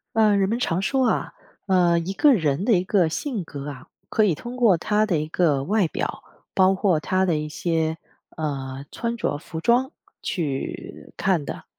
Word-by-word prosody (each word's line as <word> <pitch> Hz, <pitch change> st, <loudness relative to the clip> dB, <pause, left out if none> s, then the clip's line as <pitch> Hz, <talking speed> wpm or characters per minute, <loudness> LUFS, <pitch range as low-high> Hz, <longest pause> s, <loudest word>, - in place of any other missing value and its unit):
呃， 215 Hz, -2 st, +4 dB
人 195 Hz, -1 st, +2 dB
们 230 Hz, -, 0 dB
常 175 Hz, -6 st, 0 dB
说 260 Hz, +4 st, +1 dB
啊， -, -, -1 dB, 0.3 s
呃， 175 Hz, -2 st, +4 dB
一 185 Hz, +4 st, -4 dB
个 290 Hz, +6 st, +5 dB
人 160 Hz, -, 0 dB
的 235 Hz, -, +4 dB
一 180 Hz, -2 st, +3 dB
个 185 Hz, -2 st, +2 dB
性 230 Hz, -, -3 dB
格 145 Hz, -3 st, -7 dB
啊， 140 Hz, +2 st, -10 dB, 0.2 s
可 220 Hz, -, +2 dB
以 200 Hz, -5 st, +3 dB
通 240 Hz, +10 st, -7 dB
过 230 Hz, -7 st, +5 dB
他 210 Hz, +5 st, +1 dB
的 180 Hz, -7 st, 0 dB
一 155 Hz, -, -3 dB
个 155 Hz, -4 st, +1 dB
外 200 Hz, +3 st, +2 dB
表， -, -, -4 dB, 0.3 s
包 190 Hz, -1 st, +5 dB
括 190 Hz, -4 st, +2 dB
他 185 Hz, +5 st, +1 dB
的 170 Hz, -4 st, +1 dB
一 150 Hz, 0 st, -3 dB
些， 160 Hz, 0 st, -1 dB, 0.4 s
呃， 135 Hz, -4 st, -4 dB
穿 235 Hz, 0 st, -3 dB
着 145 Hz, -, -1 dB
服 160 Hz, +1 st, -7 dB
装 250 Hz, -, +2 dB, 0.3 s
去 145 Hz, -6 st, -4 dB
看 180 Hz, -6 st, +1 dB
的。 -, -, -6 dB
180 Hz, 205 characters per minute, -24 LUFS, 155-210 Hz, 0.4 s, 个